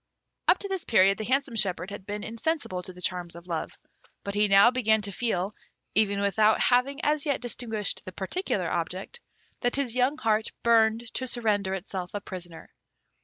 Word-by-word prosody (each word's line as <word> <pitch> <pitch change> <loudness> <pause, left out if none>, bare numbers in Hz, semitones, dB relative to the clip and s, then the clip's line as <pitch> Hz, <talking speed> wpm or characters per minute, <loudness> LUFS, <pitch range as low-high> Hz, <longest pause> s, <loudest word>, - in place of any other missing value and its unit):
Up - - +6
to 400 - -5
this 385 -3 -3
period 195 -2 +4
the 215 - -3
handsome 270 0 0
shepherd 185 -2 0
had 200 -1 -8
been 205 0 -4
insensible 230 - -2
to 185 - -9
the 180 0 -13
charms 175 -1 -2
of 170 0 -11
Love; 165 -3 -4 0.5
but 200 - -4
he 210 +1 +3
now 200 +4 +7
began 220 -4 +2
to 200 -1 -3
feel, 200 -2 -1 0.4
even 200 -2 +2
without 210 +2 +3
having 255 +3 +3
as 300 0 +1
yet 280 - +1
distinguished 225 -3 -2
the 185 - -8
particular 195 - -2
object, 480 - -3 0.4
that 245 -1 0
his 270 -4 0
young 255 +4 +2
heart 220 -3 0
burned 230 0 +3
to 260 - -2
surrender 205 -6 0
itself 185 0 -6
a - - -1
prisoner. 175 -4 -9
215 Hz, 180 wpm, -27 LUFS, 190-245 Hz, 0.5 s, now